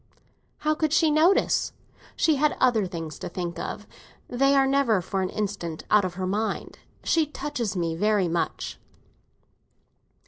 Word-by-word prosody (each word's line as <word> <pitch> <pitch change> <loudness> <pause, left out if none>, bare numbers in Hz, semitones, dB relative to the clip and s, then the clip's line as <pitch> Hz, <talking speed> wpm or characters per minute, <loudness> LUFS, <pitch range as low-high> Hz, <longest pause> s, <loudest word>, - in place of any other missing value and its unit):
"How 305 0 +1
could 310 -1 0
she 320 -1 +4
notice? 330 +6 +3 0.4
She 315 -3 +2
had 300 +2 +2
other 230 -6 +3
things 165 -3 -6
to 180 - -5
think 175 -1 -4
of; 210 - -5 0.4
they 275 +3 +2
are 270 -1 +5
never 270 -6 +3
for 190 +2 -2
an 185 - -1
instant 195 -6 -4
out 210 -1 +6
of 180 -1 -4
her 185 0 -3
mind. 210 +4 -2 0.2
She 320 -2 +2
touches 245 -8 -4
me 165 -2 0
very 205 +2 +2
much." 170 0 -3
215 Hz, 150 wpm, -26 LUFS, 185-280 Hz, 0.4 s, out